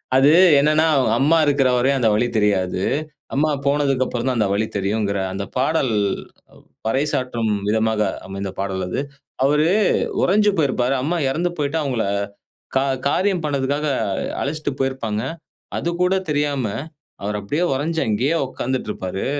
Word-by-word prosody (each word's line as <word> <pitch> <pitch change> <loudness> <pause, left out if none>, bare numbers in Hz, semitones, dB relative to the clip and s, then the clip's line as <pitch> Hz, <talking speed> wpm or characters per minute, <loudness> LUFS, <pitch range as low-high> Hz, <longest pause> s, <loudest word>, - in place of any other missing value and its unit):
அது 135 +2 +6 0.3
என்னன்னா, 155 +2 +3 0.3
அம்மா 155 +4 +4
இருக்கிறவரையும் 135 -1 +2
அந்த 115 -3 +3
வழி 120 +3 +2
தெரியாது. 95 -3 +1 0.5
அம்மா 155 +3 +2 0.2
போனதுக்கு 140 -2 +2
அப்புறம் 120 +1 -3
தான் 130 -2 0
அந்த 105 -3 +2
வழி 105 +2 +1
தெரியும்ங்கிற 100 0 0
அந்த 100 +1 -3
பாடல் 135 -2 +1 1.0
பறைசாற்றும் 125 -4 0 0.2
விதமாக 110 0 +1 0.3
அமைந்த 95 0 -5
பாடல் 95 -1 -2
அது. 90 - -2 0.4
அவரு 150 +3 +3 0.5
உறைஞ்சு 210 +2 +4
போயிருப்பாரு. 130 -3 +1
அம்மா 170 +5 0
இறந்து 170 +6 0
போயிட்டு 145 +2 0
அவங்கள 125 -6 -1 0.7
கா 135 - +3 0.2
காரியம் 185 +2 +1
பண்ணதுக்காக, 145 +1 -1 0.6
அழைச்சிட்டு 150 0 -2
போயிருப்பாங்க. 125 -5 -1 0.6
அது - - -2
கூட 180 +1 +3 0.2
தெரியாம 145 -3 0 0.6
அவர் 105 +1 -2
அப்படியே 145 - -1
உறுஞ்சு 160 +4 -1
அங்கேயே 125 +10 +1
உக்காந்துட்டு 130 -2 -3
இருப்பாரு. 95 0 -4
130 Hz, 130 wpm, -21 LUFS, 110-150 Hz, 1.0 s, அது